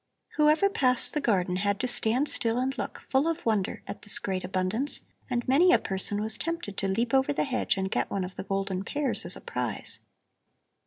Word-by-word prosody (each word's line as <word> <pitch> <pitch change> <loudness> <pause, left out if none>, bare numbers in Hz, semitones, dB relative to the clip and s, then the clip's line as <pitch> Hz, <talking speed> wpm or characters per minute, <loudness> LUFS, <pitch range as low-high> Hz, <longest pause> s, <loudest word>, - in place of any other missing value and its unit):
Whoever 305 +6 +4
passed 255 -10 +2
the 300 - 0
garden 185 -7 +1
had 200 +1 0
to 255 - 0
stand 245 +3 +2
still 230 -4 0
and 260 +2 -1
look, - - -5
full 270 +4 +2
of 330 +1 -2
wonder, 215 -4 0
at - - -7
this 210 - +4
great 190 -2 -3
abundance, 190 +9 0 0.3
and 240 -2 -2
many 320 +8 +5
a - - +7
person 200 +2 -2
was 220 +1 -3
tempted 335 - -4
to 195 - 0
leap 230 +6 -1
over 265 +1 +3
the 285 - 0
hedge 255 -6 0
and 190 0 -2
get - - 0
one 195 -2 -2
of 180 +1 -7
the - - -5
golden 195 -1 -2
pears 285 +4 -1
as - - +4
a - - -10
prize. - - -2
230 Hz, 210 wpm, -28 LUFS, 195-275 Hz, 0.3 s, a